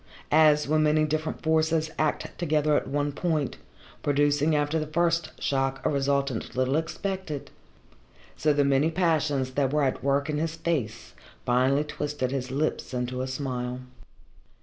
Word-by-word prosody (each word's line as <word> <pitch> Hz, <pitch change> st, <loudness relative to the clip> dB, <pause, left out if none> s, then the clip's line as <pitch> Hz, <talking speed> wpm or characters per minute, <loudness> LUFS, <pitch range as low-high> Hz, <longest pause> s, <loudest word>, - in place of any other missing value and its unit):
As 150 Hz, -1 st, +5 dB
when 155 Hz, +1 st, +2 dB
many 155 Hz, 0 st, +3 dB
different 155 Hz, +1 st, -3 dB
forces 160 Hz, 0 st, +1 dB
act 155 Hz, -1 st, -1 dB
together 155 Hz, -3 st, +2 dB
at -, -, 0 dB
one 145 Hz, +1 st, -1 dB
point, 155 Hz, -2 st, -1 dB, 0.4 s
producing 145 Hz, +1 st, +2 dB
after 150 Hz, +2 st, +1 dB
the 155 Hz, -, -3 dB
first 170 Hz, 0 st, +1 dB
shock 135 Hz, -1 st, 0 dB
a -, -, +3 dB
resultant 140 Hz, -3 st, -1 dB
little 130 Hz, +2 st, +1 dB
expected, 165 Hz, -1 st, -3 dB, 0.8 s
so 155 Hz, -, +2 dB
the 145 Hz, -1 st, +2 dB
many 140 Hz, +3 st, +3 dB
passions 155 Hz, -6 st, +1 dB
that 135 Hz, 0 st, 0 dB
were 150 Hz, 0 st, +2 dB
at 130 Hz, -, -1 dB
work 140 Hz, +1 st, +1 dB
in 150 Hz, -1 st, -1 dB
his 165 Hz, 0 st, -2 dB
face 120 Hz, -11 st, -3 dB, 0.3 s
finally 130 Hz, +4 st, +3 dB
twisted 145 Hz, -3 st, -3 dB
his 130 Hz, -2 st, -3 dB
lips 135 Hz, -1 st, -2 dB
into 125 Hz, +1 st, -2 dB
a 130 Hz, -, -2 dB
smile. 130 Hz, -2 st, -3 dB
145 Hz, 150 wpm, -27 LUFS, 135-155 Hz, 0.8 s, As